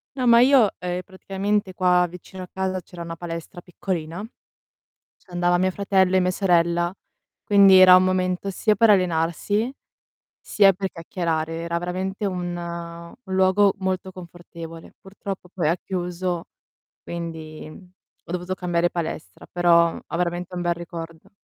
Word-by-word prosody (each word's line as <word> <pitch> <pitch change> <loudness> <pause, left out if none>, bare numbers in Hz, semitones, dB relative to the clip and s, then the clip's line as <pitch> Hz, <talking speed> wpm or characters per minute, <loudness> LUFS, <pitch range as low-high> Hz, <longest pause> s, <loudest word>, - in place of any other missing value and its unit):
No, 255 -2 -1
ma 235 0 +7
io 255 -4 +6
ehm, 180 0 -3
praticamente 195 +1 -2
qua 180 -1 +3
vicino 180 +2 -10
casa 190 -1 -2
c'era 175 0 -11
una 165 0 -6
palestra 170 +1 -7
piccolina, 175 0 -5 1.0
c'andava 175 -1 0
mio 185 +1 +2
fratello 190 -1 +2
e - - +5
mia 180 0 +1
sorella, 175 -2 +2 0.5
quindi 200 -2 +7
era 185 -1 +9
un 185 - +7
momento 185 +1 0
sia 210 +3 +1
per 225 +2 +4
allenarsi 185 - +1 0.7
sia 200 -2 +4
per 190 +1 -3
chiacchierare. 165 -1 -3
Era 170 +1 -3
veramente 185 +4 -3
un 180 -3 -2
un 170 +4 -7
luogo 190 +1 +4
molto 190 0 -2
confortevole. 170 -2 -11
Purtroppo 195 -2 -8
poi 170 -5 0
ha 170 - +2
chiuso, 180 -1 -3 0.6
quindi, 160 -2 -7
mhmm, 180 +3 -15 0.3
ho - - -9
dovuto 180 +1 -3
cambiare 175 -2 0
palestra, 165 -2 -6
però 170 -1 +4
ho - - -4
veramente 175 +1 -2
un 175 - -3
bel 175 0 +1
ricordo. 165 -1 -9
180 Hz, 145 wpm, -23 LUFS, 170-190 Hz, 1.0 s, era